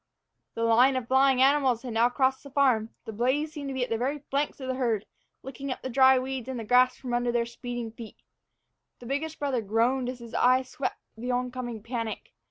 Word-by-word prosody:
The 230 - -2
line 240 +4 +5
of 255 -3 -2
flying 265 0 +4
animals 270 -4 +3
had 245 -3 -5
now 230 +2 +4
crossed 260 +1 +1
the 280 - -12
farm. 255 -6 +2 0.2
The 220 - -6
blaze 260 +8 0
seemed 290 -3 -6
to - - -4
be 260 - 0
at 245 - -5
the 225 - 0
very 270 +5 -1
flanks 285 +2 -1
of 260 - -6
the 260 - -1
herd, 235 -5 -1 0.4
licking 270 +1 -6
up - - -6
the 260 - -4
dry 265 +1 +6
weeds 260 -1 -4
and 235 -4 -5
grass 250 +1 +4
from 250 -2 -6
under 240 0 +1
their 235 -1 +1
speeding 235 -1 -6
feet. 230 -1 -11 0.8
The 245 - -13
biggest 300 +5 -3
brother 275 -5 -1
groaned 235 +5 +1
as 255 - -5
his 235 -1 -12
eye 255 +1 +4
swept 260 +1 -4 0.2
the 240 +3 -6
oncoming 250 -3 -3
panic. 230 -2 -5
255 Hz, 215 wpm, -27 LUFS, 235-265 Hz, 0.8 s, dry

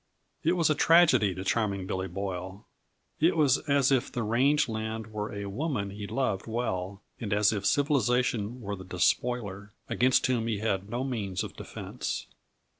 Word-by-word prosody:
It 165 - +3
was 170 -3 +2
a - - +5
tragedy 145 - +5
to 95 - -5
Charming 100 -2 0
Billy 95 0 -2
Boyle; 95 +1 -5 0.5
it 165 +2 +3
was 145 -5 +4
as 140 -1 +4
if 130 -3 +2
the 120 - -2
range 135 +7 +3
land 110 0 -4
were 105 0 -3
a 100 0 -5
woman 100 -1 -2
he 100 0 -6
loved 110 -7 -1
well, 100 -4 -3 0.2
and 110 -3 -4
as 105 +1 +3
if 100 -2 -1
civilization 125 -4 +1
were 100 -1 -4
the 95 - -9
despoiler, 100 +2 -1
against 125 +1 +3
whom 120 -3 +1
he 110 -3 0
had 100 -2 -1
no 120 +3 -2
means 105 -8 -2
of - - -7
defense. - - -5
110 Hz, 170 wpm, -28 LUFS, 100-130 Hz, 0.5 s, a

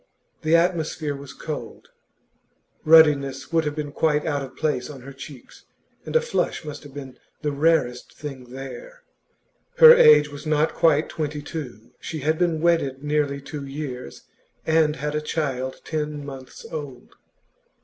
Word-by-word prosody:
The 155 +1 +3
atmosphere 165 -3 0
was 140 -1 -10
cold; 150 +2 -7 0.9
ruddiness 145 -3 +4
would 165 -1 +2
have 150 0 -2
been 150 -2 -4
quite 150 0 +1
out 145 -2 -1
of 135 -1 -8
place 150 -5 -1
on 140 -3 -9
her 135 +2 -10
cheeks, 135 -1 -12 0.4
and - - -5
a 475 - +6
flush 475 - -2
must 150 -1 -7
have 145 -3 -13
been 135 -3 -9 0.2
the 150 - 0
rarest 140 -4 +1
thing 135 -4 -7
there. 135 - -9 0.7
Her 475 -1 +11
age 150 - +7
was 145 +2 -9
not 155 +1 +2
quite 160 -2 +3
two - - -6
and 145 - -5
twenty; 145 -5 -6 0.2
she 160 -2 -6
had 155 +3 0
been 170 -3 +1
wedded 150 -6 +1
nearly 145 -1 0
two 145 0 -7
years, 135 - -7 0.4
and 160 -1 +3
had 150 +1 -3
a 150 - -1
child 135 -5 -3
ten 150 -2 -3
months 135 -2 -10
old. 145 -6 -7
150 Hz, 160 wpm, -24 LUFS, 140-160 Hz, 0.9 s, Her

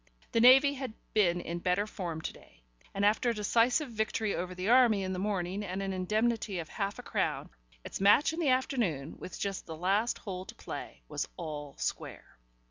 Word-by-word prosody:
The 230 - +2
Navy 270 +4 +8
had 260 -5 -6 0.2
been 175 -5 +3
in 170 0 -4
better 180 +3 +1
form 175 -6 -5
to - - -4
day, - - -19 0.3
and 200 +1 0
after 215 +4 +3
a - - +1
decisive 235 +7 +2
victory 220 -1 -1
over 180 +1 -4
the 185 +2 -3
Army 235 -4 +5
in 190 0 -2
the 180 - -3
morning 195 0 -2
and 185 -1 -4
an 195 0 -2
indemnity 215 +2 0
of 165 -2 -5
half 200 -1 -3
a - - -8
crown, - - -2 0.3
its - - -6
match 210 +11 +5
in 330 - -4
the 315 -5 +2
afternoon, 230 - 0
with - - -8
just 200 -2 -3
the 160 -1 -6
last 200 +7 +1
hole 185 -3 -6
to - - -11
play, 65 - -8
was - - -3
all 145 -2 -6
square. - - -5
200 Hz, 200 wpm, -31 LUFS, 180-230 Hz, 0.3 s, Navy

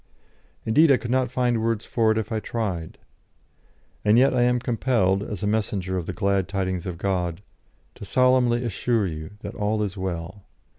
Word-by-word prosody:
Indeed, 150 +9 +5
I 135 - +6
could 120 - -5
not 130 -1 +2
find 120 -2 0
words 115 -1 -1
for 115 -2 +2
it 110 - 0
if 110 +1 -3
I 110 - 0
tried. 100 -8 -4 1.1
And 105 +2 +4
yet 130 +2 +5
I 125 - +2
am 125 0 +3
compelled, 115 -6 +1
as 105 -1 -5
a - - +1
messenger 100 -3 -1
of 90 -3 -3
the - - -2
glad 100 -1 0
tidings 95 -2 -2
of 90 -2 -4
God, 90 -1 -2 0.5
to - - -12
solemnly 125 +1 +3
assure 115 0 0
you 80 0 -6
that 100 +1 -6
all 105 0 -1
is 100 -1 -4
well. 95 +1 -5
105 Hz, 185 wpm, -24 LUFS, 95-120 Hz, 1.1 s, I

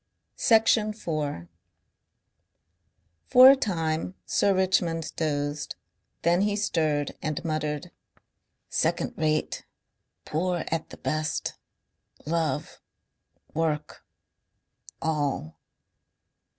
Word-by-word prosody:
Section 220 -1 +4
4 150 - -3 1.8
For 255 +1 +10
a - - +6
time 165 -7 -1
Sir 200 - +2
Richmond 175 -3 +1
dozed. 145 -2 -2 0.5
Then 175 +2 +3
he 205 0 +1
stirred 155 -8 0
and 155 +2 -3
muttered. 155 -2 -2 0.8
"Second - - 0
rate... 155 -1 0 0.6
Poor 175 +3 -1
at 165 -1 -2
the - - -10
best... 155 0 -2 0.7
Love... 160 -1 -2 0.7
Work. 155 -2 -2 1.0
All..." 145 - -1
160 Hz, 80 wpm, -27 LUFS, 150-185 Hz, 1.8 s, For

